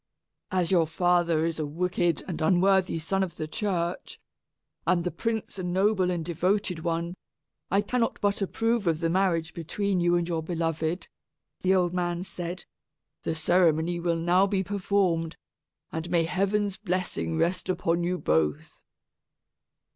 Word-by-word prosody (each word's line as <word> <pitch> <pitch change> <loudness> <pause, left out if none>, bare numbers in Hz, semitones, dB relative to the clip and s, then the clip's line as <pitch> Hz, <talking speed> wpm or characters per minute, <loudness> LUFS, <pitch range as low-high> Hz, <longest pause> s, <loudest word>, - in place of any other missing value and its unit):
"As 180 -2 0
your 170 -4 +4
father 170 -1 +2
is 165 -1 -2
a 155 - 0
wicked 175 +1 0
and 170 -4 -4
unworthy 185 +1 +3
son 190 +5 -1
of 175 -3 -3
the 155 - -3
church, 175 0 -2 0.7
and 180 -2 +3
the 180 - -1
prince 220 +2 -3
a - - -3
noble 190 +1 +2
and 170 -3 -2
devoted 180 +2 0
one, 170 +1 -2 0.6
I 200 - +3
cannot 230 +3 -1
but 205 0 0
approve 225 +1 0
of 165 -2 +3
the 165 0 0
marriage 170 -3 +1
between 185 +4 -1
you 175 0 +3
and 175 -1 0
your 165 -2 -1
beloved," 165 0 -2 0.5
the 190 +1 +3
old 180 -2 +2
man 175 -1 -1
said. 175 -1 -6 0.6
"The 160 - -2
ceremony 170 0 +2
will 170 -1 0
now 175 +4 +3
be 195 -1 0
performed, 185 -4 0 0.5
and 160 +1 -4
may 170 -1 +3
heaven's 200 +3 0
blessing 175 - -2
rest 180 - 0
upon 170 -1 +1
you 180 +1 0
both." 75 - -1
175 Hz, 150 wpm, -27 LUFS, 165-190 Hz, 0.7 s, your